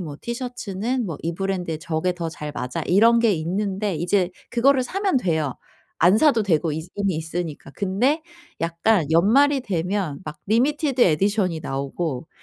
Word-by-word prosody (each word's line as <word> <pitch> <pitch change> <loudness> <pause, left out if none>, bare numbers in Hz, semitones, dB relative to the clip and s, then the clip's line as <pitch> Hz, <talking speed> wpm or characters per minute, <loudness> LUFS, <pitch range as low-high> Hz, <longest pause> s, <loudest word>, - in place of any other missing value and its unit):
뭐 155 -5 -6
티셔츠는 240 -1 -3
뭐 165 -6 -5
이 165 +1 -2
브랜드의 180 -4 -3
저게 175 +1 -1
더 170 -2 -4
잘 150 -1 -6
맞아.' 125 0 -3
이런 230 +6 +5
게 230 -3 +4
있는데 195 +4 -2
이제 180 +2 +1 0.2
그거를 255 +2 +3
사면 385 0 0
돼요. 160 - -1 0.5
안 180 +5 +6
사도 275 -5 +4
되고 165 -4 +1
이제 160 +3 -4
이미 200 -4 0
있으니까. 160 -3 -5
근데 245 - +1 0.4
약간 170 +3 +2
연말이 265 - +4
되면 185 - -2
막 150 -1 -7
리미티드 270 - +1
에디션이 190 -1 +2
나오고 140 +1 -3
185 Hz, 320 characters per minute, -23 LUFS, 160-230 Hz, 0.5 s, 안